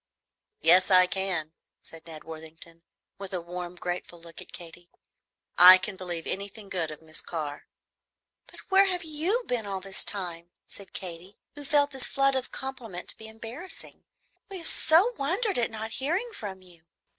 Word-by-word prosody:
"Yes, 180 +3 +6
I 185 -1 +7
can," 180 -4 -1 0.3
said 165 0 -13
Ned 155 -2 -10
Worthington, 160 +1 -11 0.4
with 195 -1 -7
a - - -1
warm, 175 +1 -6
grateful 175 -1 -5
look 165 0 -12
at - - -12
Katy. 175 0 -11 0.7
"I 180 +1 +12
can 195 +1 -4
believe 175 -3 -5
anything 200 +1 -5
good 170 -5 -1
of 155 +1 -10
Miss 155 0 -4
Carr." 150 -4 -5 0.8
"But - - -13
where 385 0 +6
have 360 -2 0
you 330 +10 -1
been 230 -4 -2
all 195 -1 -2
this 195 0 -4
time?" 175 -4 -5 0.2
said 200 - -12
Katy, 180 +1 -7 0.2
who 290 - -9
felt 285 0 +2
this 265 -2 0
flood 275 0 +3
of 260 -1 -2
compliment 240 -9 -5
to - - -3
be 220 - -9
embarrassing; 230 +11 -9 0.5
"we 390 - -6
have 335 - -7
so 365 +10 +5
wondered 380 - +1
at 235 - +2
not 220 0 -5
hearing 350 - -1
from 195 - -7
you." 175 -3 -19
190 Hz, 170 wpm, -28 LUFS, 175-270 Hz, 0.8 s, I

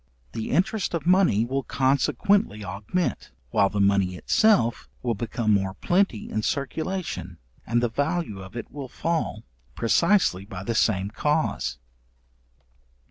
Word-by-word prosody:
The 110 - -4
interest 185 +4 0
of 170 - -3
money 175 - +4
will 135 +3 -1
consequently 135 - +1
augment, 105 - -2 0.2
while 100 - +3
the 105 - -3
money 100 -2 +2
itself 190 - +2
will 120 -2 +1
become 115 +1 -1
more 95 -1 0
plenty 175 - +1
in 110 - -1
circulation, 160 - -3 0.3
and 120 +2 +1
the - - +3
value 145 - -2
of 95 +3 -11
it 115 - -7
will 140 -2 -6
fall, 165 -10 -2 0.3
precisely 145 - +2
by 95 -3 -8
the 115 - -2
same 100 -3 +1
cause. 150 - 0
120 Hz, 135 wpm, -25 LUFS, 100-170 Hz, 0.3 s, money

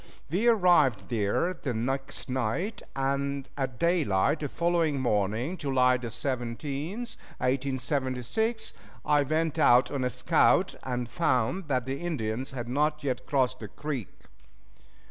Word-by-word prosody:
We 200 +8 +1
arrived 165 - +4
there 115 - +1
the 140 -8 -4
next 135 +5 -2
night, 130 - -2
and 140 0 -1
at 130 -4 -3
daylight 150 - +2
the 145 - -3
following 170 -4 +1
morning, 115 - 0
July 130 -4 +3
17, 135 - -3
1876, 140 - -2 0.3
I 150 -1 +4
went 155 +2 0
out 125 +1 +5
on 140 -2 -1
a 125 - +1
scout, - - +3
and 125 -2 -3
found 160 +3 0
that 130 -4 0
the 135 +1 -3
Indians 130 -7 -2
had 120 -3 -5
not 150 +4 0
yet 130 -3 -2
crossed 130 -2 +1
the 110 - -6
creek. 140 -2 -4
135 Hz, 125 wpm, -28 LUFS, 125-155 Hz, 0.3 s, out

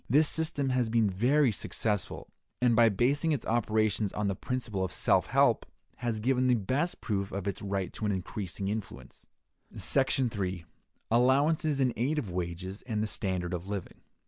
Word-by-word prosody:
This 150 +5 +5
system 150 -4 +1
has 125 -3 +1
been 115 -1 +3
very 125 +8 +3
successful, 105 0 -2 0.3
and, 125 -2 +3
by 115 0 +6
basing 140 - +1
its 145 - -3
operations 110 -2 +1
on 105 -1 -2
the 100 - -1
principle 115 -4 -3
of 95 - -2
self - - +2
help, - - +3 0.3
has 115 -2 -2
given 130 +3 +1
the 125 - +4
best 130 - -1
proof 100 -3 -2
of 100 0 -4
its 100 - -3
right 100 -2 -3
to 110 - -3
an - - +1
increasing 95 0 -4
influence. 105 0 -6 0.5
§ 135 -2 +2
3. 95 -4 -3 0.5
Allowances 140 +5 +3
in 130 -3 +2
Aid 140 +7 0
of 110 -11 -3
Wages 90 +2 -4
and 110 -3 -1
the - - 0
Standard 95 -4 -2
of 90 +1 -4
Living. 100 -2 -6
110 Hz, 170 wpm, -29 LUFS, 100-130 Hz, 0.5 s, by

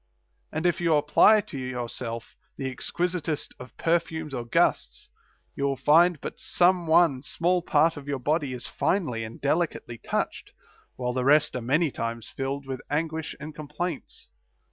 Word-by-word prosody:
And 160 +3 -3
if 175 +1 +2
you 165 -2 +3
apply 150 +9 +5
to 145 -8 -8
your 125 -2 -4
self 115 -1 -6 0.2
the 135 - -3
exquisitest 170 0 -2
of 125 0 -12
perfumes 160 -2 -1
or 120 -2 -3
gusts, 120 - 0 0.5
you 140 - -1
will 140 -1 +1
find 170 +3 +4
but - - -7
some 175 -1 +2
one 160 -5 +4
small 175 +5 0
part 160 -1 +2
of 140 -1 -9
your 140 -1 -1
body 145 +2 0
is 125 -1 -6
finely 145 - -1
and 110 +1 -8
delicately 145 -6 -1
touched, - - -3 0.4
while 125 -1 -2
the 125 0 -1
rest 150 +2 +4
are 125 - -2
many 145 +6 +1
times 115 -1 -4
filled 135 +1 -4
with 130 -1 -5
anguish 160 +1 -2
and 155 +1 -7
complaints. 155 +2 -6
150 Hz, 165 wpm, -26 LUFS, 130-165 Hz, 0.5 s, apply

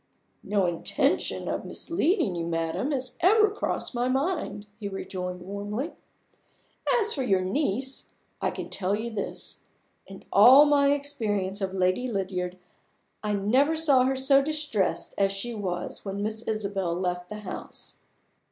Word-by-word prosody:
"No 200 -2 +1
intention 175 -1 0
of - - -2
misleading 335 - 0
you, 170 -1 -3
madam, 165 - -1
has 255 -3 -3
ever 425 +3 +5
crossed 420 - -3
my 245 +1 0
mind," 270 - -1
he 205 - -4
rejoined 180 -2 -5
warmly. 205 - -4 1.1
"As 440 0 +1
for 275 - -2
your 195 -7 +2
niece, 260 +5 -2 0.3
I - - +1
can - - -7
tell 195 +1 0
you 230 +3 -4
this. 215 -2 -6 0.4
In 195 0 -11
all 255 +8 +9
my 285 -1 +4
experience 215 -9 -1
of 190 0 -2
Lady 185 +7 +1
Lydiard, 185 -3 -2 0.7
I 210 -1 0
never 255 +10 +3
saw 290 -5 +4
her 265 +1 +1
so 275 +1 +5
distressed 290 -9 -1
as 195 0 +3
she 195 +5 -3
was 185 -5 -4
when 200 0 -4
Miss 220 +1 -3
Isabel 200 -5 -1
left 180 0 -2
the 210 0 -6
house!" 195 - -8
210 Hz, 145 wpm, -27 LUFS, 190-275 Hz, 1.1 s, all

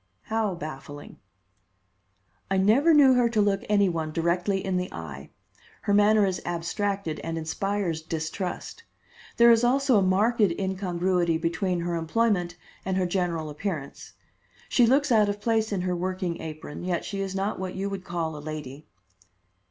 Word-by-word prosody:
"How 220 -4 -1
baffling?" 145 -3 -9 1.3
"I 195 - +1
never 225 - +4
knew 285 -4 +7
her 245 -2 +3
to 225 -2 0
look 200 -1 +2
any 205 -1 +4
one 160 -3 -2
directly 180 +4 0
in 190 -1 0
the 180 0 -3
eye. - - -8 0.5
Her 205 - +1
manner 210 0 +5
is 185 -2 -2
abstracted 175 0 -2
and 165 0 -4
inspires 170 +1 -2
distrust. 160 +4 -5 0.5
There 235 0 +7
is 230 0 +4
also 260 -2 +3
a - - +2
marked 205 +5 +2
incongruity 180 -2 +1
between 170 +2 -1
her 175 0 -2
employment 175 +1 0 0.3
and 190 0 -1
her 185 - +1
general 175 -4 -1
appearance. 150 -3 -5 0.6
She 245 -3 +4
looks 275 +3 +3
out 215 -3 +4
of 205 0 -3
place 220 0 0
in 195 -3 -1
her 180 0 -1
working 185 -1 -3
apron, 155 0 -7
yet 180 -1 -2
she 200 -1 -4
is 190 -1 -4
not 195 +1 -2
what 185 -1 -4
you 195 +1 -2
would 195 -2 -5
call 165 -3 -3
a 150 - -7
lady." 150 -1 -7
185 Hz, 160 wpm, -26 LUFS, 170-205 Hz, 1.3 s, knew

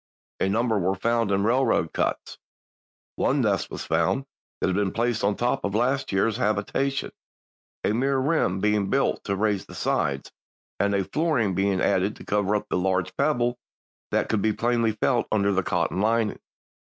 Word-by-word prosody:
A 95 - +1
number 110 +1 +1
were 95 +1 0
found 115 +2 0
in 100 0 +1
railroad 125 +5 +2
cuts. - - -2 0.8
One - - +2
nest - - 0
was - - -6
found 135 - +1 0.3
that - - 0
had 95 - 0
been 100 -1 +1
placed 120 -1 0
on 100 0 +2
top 120 +1 -1
of 100 0 -2
a - - +3
last 130 +4 0
year's 100 +3 +1
habitation, 125 +5 -1 0.7
a - - +1
mere 135 +4 +1
rim 130 - +1
being 105 0 +1
built 135 0 +1
to 100 - -1
raise 100 -1 0
the - - -11
sides, - - -1 0.5
and 100 0 +2
a 100 - +1
flooring 135 - 0
being 95 0 +1
added 95 +3 +1
to - - -12
cover 105 0 +1
up 105 - -1
a - - +1
large 95 0 0
pebble 120 -4 +1 0.5
that - - 0
could 110 -2 0
be 110 +1 +2
plainly 115 0 +1
felt 120 +3 +1
under 100 -2 +2
the 95 -1 +2
cotton 90 +1 -1
lining." 110 0 +1
105 Hz, 180 wpm, -25 LUFS, 100-120 Hz, 0.8 s, a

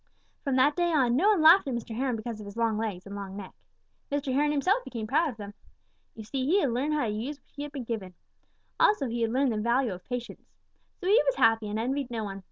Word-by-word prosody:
From 275 -3 0
that 275 +3 +4
day 345 -1 +1
on, 255 -6 +3
no 370 +10 +4
one 395 -7 +3
laughed 330 +1 +7
at 260 - -1
Mr. 230 -1 -5
Heron 255 0 0
because 225 0 -6
of 210 - -8
his 200 +2 -10
long 230 -2 +1
legs 210 -4 -3
and 200 0 -8
long 200 -1 -7
neck. 195 -2 -8 0.6
Mr. 285 -2 -1
Heron 295 +2 +2
himself 370 - +1
became 230 - -5
proud 305 +8 +2
of 240 - -8
them. 205 -1 -8 0.6
You 220 - -8
see, 260 +5 -3
he 360 +8 +3
had 280 -9 +1
learned 280 +6 0
how 295 - +1
to 215 - -1
use 250 +8 -4
what - - -38
he 290 - -5
had 295 - -7
been 275 -3 -5
given. 210 -6 -5 0.6
Also 360 -11 +3
he 235 0 -3
had 225 -1 +1
learned 260 +1 +2
the 220 - -2
value 235 +1 +1
of 180 0 -10
patience. 245 -1 -6 0.5
So 365 - -4
he 430 +6 +6
was - - +2
happy 225 - +3
and 210 - -3
envied 260 +3 -2
no 230 -2 -3
one. 195 -1 -6
245 Hz, 260 wpm, -28 LUFS, 220-290 Hz, 0.6 s, laughed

